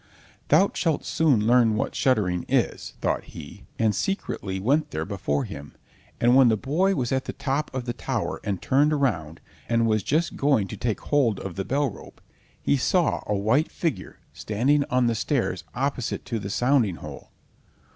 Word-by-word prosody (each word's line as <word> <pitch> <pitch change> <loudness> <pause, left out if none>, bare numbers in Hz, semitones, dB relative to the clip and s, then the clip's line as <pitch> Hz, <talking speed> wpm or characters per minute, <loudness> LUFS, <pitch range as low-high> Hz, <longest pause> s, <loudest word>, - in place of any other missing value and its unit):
"Thou 200 - +4
shalt 160 -4 -1
soon 140 -10 +2
learn 115 -2 +4
what 105 - -2
shuddering 95 -9 +1
is," - - 0
thought - - 0
he, - - -11
and 110 -2 +2
secretly 100 - -3
went 145 +9 +1
there 80 - -3
before 90 -8 -2
him; 70 +1 -9 0.4
and 120 +1 +4
when 135 -1 +7
the 110 - +2
boy 175 - +1
was 125 -4 -2
at 130 0 0
the - - -5
top 140 +2 -2
of 130 -2 -4
the 120 - -2
tower - - -3
and 100 -3 -3
turned 145 +3 +3
around, 85 - -1 0.3
and 115 -1 +2
was 110 -1 +2
just 155 - 0
going 140 -8 +2
to - - -5
take 115 -3 -2
hold 130 -8 +1
of 95 - -5
the 95 - -2
bell 140 -1 0
rope, - - -13 0.4
he 140 - +1
saw 170 +5 +1
a 105 - 0
white 110 - +1
figure 165 -6 -3 0.2
standing 130 +8 +1
on 125 0 +2
the 115 - +2
stairs 120 +3 -1
opposite 130 -2 -2
to 115 - -3
the 100 -1 -6
sounding 120 -4 +2
hole. - - -10
125 Hz, 180 wpm, -25 LUFS, 105-145 Hz, 0.4 s, when